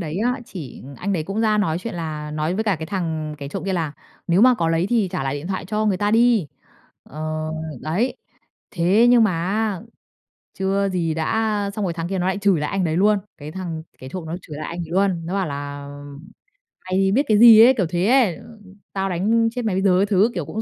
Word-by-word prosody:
đấy 165 Hz, +1 st, -4 dB
á 245 Hz, +4 st, 0 dB
chỉ 160 Hz, -, -9 dB
anh 200 Hz, +8 st, -2 dB
đấy 165 Hz, -5 st, 0 dB
cũng 195 Hz, +6 st, -3 dB
ra 215 Hz, -1 st, +2 dB
nói 170 Hz, -5 st, 0 dB
chuyện 225 Hz, +3 st, -6 dB
là 155 Hz, -3 st, -5 dB
nói 155 Hz, +3 st, -2 dB
với 220 Hz, +3 st, -1 dB
cả 205 Hz, -5 st, +1 dB
cái 160 Hz, +1 st, -6 dB
thằng 160 Hz, -5 st, -3 dB
kẻ 140 Hz, -2 st, -6 dB
trộm -, -, -5 dB
kia 195 Hz, -, -1 dB
là 165 Hz, -5 st, -1 dB, 0.3 s
"Nếu 175 Hz, +1 st, +3 dB
mà 250 Hz, +2 st, +6 dB
có 165 Hz, -8 st, 0 dB
lấy 165 Hz, +2 st, +1 dB
thì 225 Hz, -5 st, +2 dB
trả -, -, -2 dB
lại 135 Hz, 0 st, -2 dB
điện 145 Hz, +3 st, -6 dB
thoại 190 Hz, 0 st, -3 dB
cho 215 Hz, +4 st, -1 dB
người 200 Hz, -3 st, +2 dB
ta 205 Hz, +2 st, 0 dB
đi!" 230 Hz, -5 st, +3 dB, 0.6 s
Ờ, 155 Hz, +1 st, -4 dB, 0.3 s
đấy. 190 Hz, +12 st, -1 dB, 0.5 s
Thế 190 Hz, +6 st, +3 dB
nhưng 240 Hz, -2 st, +6 dB
mà 210 Hz, -, +2 dB
á 205 Hz, -1 st, -1 dB, 0.8 s
chưa 195 Hz, +1 st, +1 dB
gì 170 Hz, -4 st, -1 dB
đã, 160 Hz, 0 st, -2 dB
a 215 Hz, -2 st, 0 dB
xong 205 Hz, +1 st, -4 dB
rồi 180 Hz, -, -1 dB
thằng 165 Hz, 0 st, -4 dB
kia 190 Hz, 0 st, -2 dB
nó 180 Hz, -, 0 dB
lại 190 Hz, +1 st, 0 dB
chửi 200 Hz, -5 st, +2 dB
lại 150 Hz, -, -2 dB
anh 195 Hz, -2 st, 0 dB
đấy 160 Hz, -1 st, 0 dB
luôn, 205 Hz, +3 st, +4 dB, 0.2 s
cái 150 Hz, +1 st, -8 dB
thằng 170 Hz, -3 st, -5 dB, 0.2 s
kẻ 130 Hz, -, -9 dB
trộm 180 Hz, +2 st, -6 dB
nó 165 Hz, +2 st, -4 dB
chửi 150 Hz, -5 st, -9 dB
lại 155 Hz, -, -5 dB
anh 170 Hz, -, -6 dB
ấy 165 Hz, -2 st, -6 dB
luôn. 180 Hz, -2 st, 0 dB
Nó 180 Hz, -, -3 dB
bảo 195 Hz, -2 st, 0 dB
là 145 Hz, -1 st, -6 dB, 1.0 s
"Mày 185 Hz, 0 st, -1 dB
thì 195 Hz, 0 st, +2 dB
biết 260 Hz, +8 st, +3 dB
cái 210 Hz, -1 st, +4 dB
gì?" 225 Hz, -1 st, +9 dB
ấy, 260 Hz, -, +6 dB
kiểu 190 Hz, -, +2 dB
thế 175 Hz, +1 st, 0 dB
ấy, 240 Hz, -8 st, +3 dB, 0.5 s
"Tao 195 Hz, 0 st, -1 dB
đánh 225 Hz, +6 st, +2 dB
chết 245 Hz, 0 st, -4 dB
mày 205 Hz, -4 st, 0 dB
bây 190 Hz, -, +1 dB
giờ!" 185 Hz, -2 st, +4 dB
các 200 Hz, +2 st, +1 dB
thứ, 205 Hz, +4 st, +3 dB
kiểu 170 Hz, -5 st, -2 dB
cũng 220 Hz, -, -4 dB
185 Hz, 245 wpm, -22 LUFS, 160-210 Hz, 1.0 s, gì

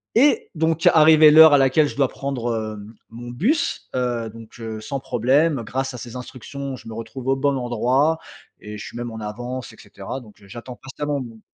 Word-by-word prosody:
Et, 280 Hz, +5 st, +3 dB
donc, 160 Hz, 0 st, +1 dB
arrivée 155 Hz, -1 st, +7 dB
l'heure 160 Hz, -1 st, +9 dB
à -, -, +7 dB
laquelle 135 Hz, +3 st, +3 dB
je -, -, -7 dB
dois 135 Hz, -2 st, +2 dB
prendre, 125 Hz, -4 st, -3 dB, 0.2 s
hem, 105 Hz, +2 st, -11 dB, 0.2 s
mon 120 Hz, +1 st, -9 dB
bus. 235 Hz, -, -1 dB
Heu, 120 Hz, -3 st, -1 dB
donc, 115 Hz, +1 st, -13 dB
heu, 110 Hz, -1 st, -6 dB
sans 140 Hz, +3 st, -4 dB
problème. 135 Hz, +3 st, +1 dB
Grâce 130 Hz, +2 st, -3 dB
à -, -, -7 dB
ces 120 Hz, 0 st, -9 dB
instructions, 135 Hz, +2 st, -7 dB
je 125 Hz, -, -13 dB
me -, -, -7 dB
retrouve 115 Hz, +3 st, -8 dB
au 135 Hz, -, +3 dB
bon 140 Hz, 0 st, +1 dB
endroit 130 Hz, +5 st, +1 dB, 0.4 s
et 105 Hz, 0 st, -9 dB
je -, -, -8 dB
suis -, -, -9 dB
même 120 Hz, -1 st, -5 dB
en 110 Hz, -, -7 dB
avance 120 Hz, +3 st, -6 dB
et 110 Hz, -, -17 dB
cetera. 100 Hz, +5 st, -8 dB
Donc, 110 Hz, -5 st, -17 dB
heu, 100 Hz, -, -17 dB
j'attends 120 Hz, +4 st, -9 dB
patiemment 145 Hz, +1 st, -4 dB
mon 115 Hz, -3 st, -10 dB
125 Hz, 210 wpm, -22 LUFS, 115-145 Hz, 0.4 s, l'heure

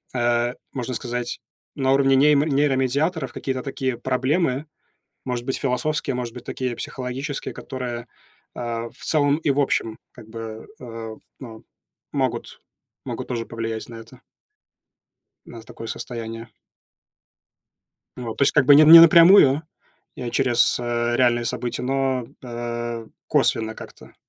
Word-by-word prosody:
э, 120 Hz, 0 st, +1 dB, 0.2 s
можно 130 Hz, -1 st, -4 dB
сказать, 120 Hz, 0 st, -4 dB, 0.4 s
на 135 Hz, -2 st, +1 dB
уровне 135 Hz, 0 st, +4 dB
неймо 145 Hz, +1 st, +4 dB
нейромедиаторов 140 Hz, +1 st, 0 dB
какие-то 130 Hz, -1 st, -3 dB
такие 130 Hz, -3 st, -3 dB
проблемы, 130 Hz, +3 st, 0 dB, 0.6 s
может 125 Hz, -2 st, -3 dB
быть, 130 Hz, -, -2 dB
философские, 135 Hz, +2 st, -1 dB
может 125 Hz, -2 st, -4 dB
быть, 125 Hz, -, -10 dB
такие 125 Hz, -2 st, -3 dB
психологические, 135 Hz, +3 st, -5 dB
которые, 125 Hz, -2 st, -6 dB, 0.5 s
а, 115 Hz, -1 st, -4 dB
в -, -, -25 dB
целом 145 Hz, -2 st, +2 dB
и 160 Hz, -2 st, -1 dB
в 140 Hz, +1 st, +2 dB
общем 115 Hz, -5 st, 0 dB, 0.2 s
как 120 Hz, -3 st, -14 dB
бы, 110 Hz, -1 st, -8 dB
э, 115 Hz, -2 st, -8 dB, 0.2 s
ну, 115 Hz, -4 st, -10 dB, 0.5 s
могут -, -, -2 dB, 0.4 s
могут -, -, -6 dB
тоже 120 Hz, -2 st, -3 dB
повлиять 115 Hz, -1 st, -5 dB
на 115 Hz, -, -9 dB
это. 115 Hz, +3 st, -14 dB, 1.2 s
На 115 Hz, -, -11 dB
такое 115 Hz, -, -10 dB
состояние. 115 Hz, -1 st, -6 dB, 1.7 s
Вот, 120 Hz, -3 st, -6 dB
то -, -, +1 dB
есть 140 Hz, -, +4 dB
как 150 Hz, -, +4 dB
бы, 145 Hz, +2 st, +7 dB
не 150 Hz, -, +8 dB
не 165 Hz, +2 st, +11 dB
напрямую. 165 Hz, -3 st, +7 dB, 0.5 s
Я 120 Hz, -2 st, -5 dB
через, 120 Hz, -1 st, +2 dB
э, 120 Hz, 0 st, -1 dB
реальные 120 Hz, -2 st, +2 dB
события, 120 Hz, +1 st, -3 dB
но, 130 Hz, -1 st, -1 dB, 0.2 s
э, 120 Hz, -1 st, -5 dB, 0.2 s
косвенно 110 Hz, 0 st, +1 dB
как-то. -, -, -13 dB
125 Hz, 135 wpm, -23 LUFS, 120-135 Hz, 1.7 s, не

